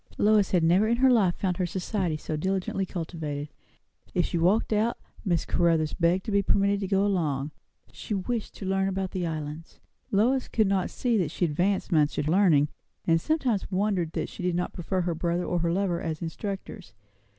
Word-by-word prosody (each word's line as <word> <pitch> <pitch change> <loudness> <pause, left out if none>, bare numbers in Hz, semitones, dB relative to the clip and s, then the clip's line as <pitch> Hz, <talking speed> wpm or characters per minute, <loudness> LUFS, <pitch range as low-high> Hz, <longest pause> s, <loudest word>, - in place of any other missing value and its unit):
Lois 210 -2 +4
had 180 -3 +2
never 180 +6 +4
in 235 +1 +2
her 260 +1 +5
life 195 -8 +3
found 185 -3 -1
her 185 - 0
society 180 -2 -2
so 155 - -4
diligently 190 +3 -1
cultivated. 155 -5 -5 0.7
If 175 - +2
she 170 - -1
walked 200 +7 +2
out, 220 +3 +1 0.3
Miss 175 -6 0
Caruthers 165 -3 +2
begged 175 +2 +1
to 220 - -3
be 200 0 +3
permitted 200 0 +2
to 195 - -3
go 195 +1 +2
along; 155 -8 0 0.4
she 210 - -4
wished 220 +4 -3
to 195 - -7
learn 195 0 +1
about 190 -1 -2
the 180 -2 -2
Islands. 155 0 -6 0.3
Lois 250 +6 +2
could 220 - +2
not 195 -2 +1
see 240 -3 0
that 170 -5 0
she 175 - -1
advanced 180 +6 0
much 150 -3 +2
in - - 0
learning; 160 -4 +4 0.4
and 165 -1 +3
sometimes 255 - 0
wondered 185 -4 0
that - - -2
she - - -9
did 180 -1 0
not 180 0 -2
prefer 185 +2 -2
her 175 -1 -1
brother 170 +2 -1
or 175 - 0
her 170 0 +1
lover 180 -1 0
as 160 -2 -3
instructors. 195 +3 -6
185 Hz, 195 wpm, -27 LUFS, 165-200 Hz, 0.7 s, her